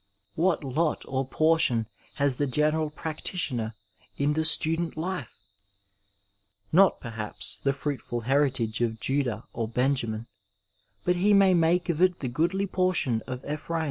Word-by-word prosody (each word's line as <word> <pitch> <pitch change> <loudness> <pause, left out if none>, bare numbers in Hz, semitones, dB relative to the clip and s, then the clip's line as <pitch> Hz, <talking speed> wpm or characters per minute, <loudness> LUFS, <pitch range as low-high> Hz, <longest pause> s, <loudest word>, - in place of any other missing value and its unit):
What 170 -1 +1
lot 150 +4 -1
or 130 0 -2
portion 155 -7 +2 0.3
has 140 -3 +1
the 145 - 0
general 150 +3 +1
practitioner 150 - -2 0.4
in 145 +1 +1
the 160 +1 0
student 165 +1 +3
life! 165 -6 -4 1.3
Not, 190 +3 +5
perhaps, 115 -3 -3
the 140 - 0
fruitful 135 -4 -4
heritage 130 -3 0
of 115 -2 -1
Judah 125 -4 -1
or 115 -1 -2
Benjamin 115 -2 0 0.8
but 180 0 +2
he 205 +3 +4
may 195 -1 +5
make 175 +1 +2
of 170 -1 -1
it 185 -1 +4
the 130 - -4
goodly 170 +9 0
portion 185 - +1
of 130 0 -6
Ephraim. 155 +3 -3
145 Hz, 140 wpm, -27 LUFS, 125-170 Hz, 1.3 s, Not